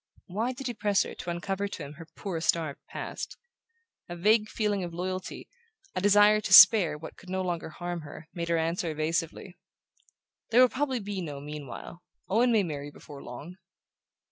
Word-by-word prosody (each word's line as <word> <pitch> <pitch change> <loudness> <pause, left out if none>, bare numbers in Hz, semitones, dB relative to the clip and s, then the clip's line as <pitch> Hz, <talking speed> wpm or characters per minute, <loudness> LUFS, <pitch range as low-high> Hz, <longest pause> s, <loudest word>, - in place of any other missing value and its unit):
Why 220 +7 -2
did 265 +1 -8
he 245 - -2
press 205 -2 +2
her - - -7
to - - -7
uncover 195 +3 -2
to 180 - -7
him 140 +1 -8
her 165 +1 -12
poor 180 -5 -4
starved 160 -4 0
past? - - -6 0.7
A 175 - -5
vague 215 +4 +3
feeling 205 -3 -1
of 170 -1 -6
loyalty, 185 +1 -5 0.5
a - - -2
desire 205 +1 +5
to 200 - -5
spare 190 -9 +8
what 160 +1 -10
could 185 - -14
no 190 0 -1
longer 175 -3 -3
harm 175 +1 -5
her, 155 +1 -11
made 170 -1 -4
her 170 - +2
answer 165 +1 -1
evasively: 165 +4 -3 0.9
"There 230 - +4
will 255 - +7
probably 260 -2 -1
be 200 -1 -4
no 145 -5 -6
'meanwhile.' 150 +3 -8 0.3
Owen 230 +6 +3
may 220 -3 +4
marry 145 -4 -5
before 145 -1 -12
long." 145 +9 -9
180 Hz, 180 wpm, -28 LUFS, 160-205 Hz, 0.9 s, spare